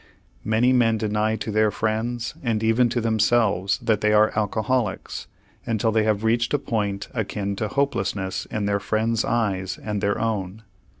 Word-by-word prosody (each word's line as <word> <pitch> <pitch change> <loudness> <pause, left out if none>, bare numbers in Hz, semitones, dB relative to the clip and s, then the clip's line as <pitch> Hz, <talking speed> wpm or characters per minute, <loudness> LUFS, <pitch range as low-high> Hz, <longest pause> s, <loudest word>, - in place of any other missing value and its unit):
Many 115 +4 +3
men 115 -3 +3
deny 110 0 0
to 110 - -4
their 110 0 +3
friends 110 +3 -2
and 115 -4 -1
even 115 +2 +3
to 120 +1 -1
themselves 110 -4 +2
that 110 -2 +1
they 105 0 +3
are 105 0 +4
alcoholics 110 +1 -1 0.4
until 115 0 +1
they 110 -1 +2
have 105 -1 +1
reached 115 +4 +2
a - - +3
point 105 -7 -2
akin 100 -3 -2
to 110 - -1
hopelessness 105 -8 -1
in 105 -2 -3
their 100 0 +1
friends' 110 +2 0
eyes 95 -5 -1
and 105 -2 -4
their 100 +1 0
own. 110 -2 -2
110 Hz, 165 wpm, -23 LUFS, 105-115 Hz, 0.4 s, are